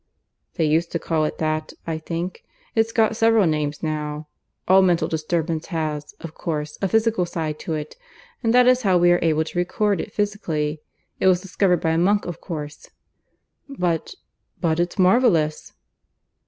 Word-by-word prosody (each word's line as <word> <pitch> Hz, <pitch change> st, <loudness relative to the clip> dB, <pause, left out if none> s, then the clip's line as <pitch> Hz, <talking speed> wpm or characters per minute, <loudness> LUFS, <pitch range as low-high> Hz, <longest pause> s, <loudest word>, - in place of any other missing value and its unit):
"They 165 Hz, -, +1 dB
used 160 Hz, +3 st, +1 dB
to -, -, +1 dB
call 160 Hz, -2 st, 0 dB
it -, -, -4 dB
that, 155 Hz, 0 st, -2 dB
I 160 Hz, -1 st, -3 dB
think. 170 Hz, +3 st, -5 dB, 0.3 s
It's 225 Hz, 0 st, +1 dB
got 225 Hz, -1 st, +2 dB
several 225 Hz, -2 st, +4 dB
names 150 Hz, -2 st, -1 dB
now. 150 Hz, -1 st, -3 dB, 0.4 s
All 190 Hz, +1 st, +6 dB
mental 175 Hz, -3 st, +2 dB
disturbance 160 Hz, 0 st, -2 dB
has, 155 Hz, -4 st, -3 dB
of 165 Hz, -2 st, -8 dB
course, 150 Hz, -3 st, -4 dB
a 195 Hz, -, +2 dB
physical 225 Hz, -1 st, +2 dB
side 160 Hz, -3 st, -4 dB
to 160 Hz, -, -3 dB
it, 150 Hz, 0 st, -6 dB, 0.4 s
and 225 Hz, -, +1 dB
that 250 Hz, +1 st, +6 dB
is 255 Hz, 0 st, +4 dB
how 190 Hz, -5 st, +3 dB
we 175 Hz, 0 st, +5 dB
are 175 Hz, -, +4 dB
able 160 Hz, -1 st, +2 dB
to 170 Hz, +2 st, -4 dB
record 200 Hz, +1 st, 0 dB
it -, -, -8 dB
physically. 160 Hz, -8 st, -2 dB, 0.4 s
It -, -, +2 dB
was 185 Hz, -1 st, +5 dB
discovered 185 Hz, -2 st, +1 dB
by 160 Hz, -, +1 dB
a 160 Hz, -, +1 dB
monk, 200 Hz, +4 st, +2 dB
of 175 Hz, -2 st, -6 dB
course." 150 Hz, -4 st, -7 dB, 0.8 s
"But... 180 Hz, -, -2 dB, 0.4 s
but 165 Hz, -1 st, 0 dB
it's 175 Hz, +3 st, -1 dB
marvellous." 185 Hz, -6 st, +3 dB
170 Hz, 170 wpm, -22 LUFS, 155-195 Hz, 0.8 s, All